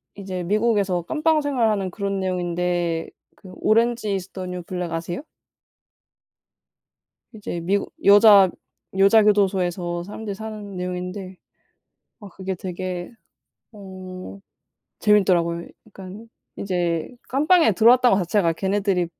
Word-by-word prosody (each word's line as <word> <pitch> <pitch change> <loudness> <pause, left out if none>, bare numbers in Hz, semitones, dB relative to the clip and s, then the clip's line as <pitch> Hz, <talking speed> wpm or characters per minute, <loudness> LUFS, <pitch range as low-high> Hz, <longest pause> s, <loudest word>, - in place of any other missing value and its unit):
이제 190 -3 -5
미국에서 205 -2 +1
감방 315 0 +1
생활하는 225 -9 0
그런 200 +1 -3
내용인데 175 -2 -2 0.3
그 185 - -14
'오렌지 230 -1 +2
이즈 190 0 -5
더 185 -1 -6
뉴 180 0 -5
블랙.' 180 -1 -5
아세요? 170 - -4 2.1
이제 200 -5 -6
미국 195 +4 -1
여자, 200 -2 +7 0.5
여자 200 +3 +6
교도소에서 185 -4 +1
사람들이 205 +2 -7
사는 210 -2 -8
내용인데 180 +1 -5 0.8
아 205 - -11
그게 190 +1 -5
되게 180 0 -5 0.6
어 185 - -10 0.6
재밌더라고요. 180 -5 +2 0.2
약간 200 +2 -11 0.3
이제 175 -4 -2 0.2
감방에 305 - +4
들어왔다는 240 +1 +5
거 180 - 0
자체가 170 -2 +1
걔네들이 195 -1 0
190 Hz, 270 characters per minute, -22 LUFS, 180-210 Hz, 2.1 s, 여자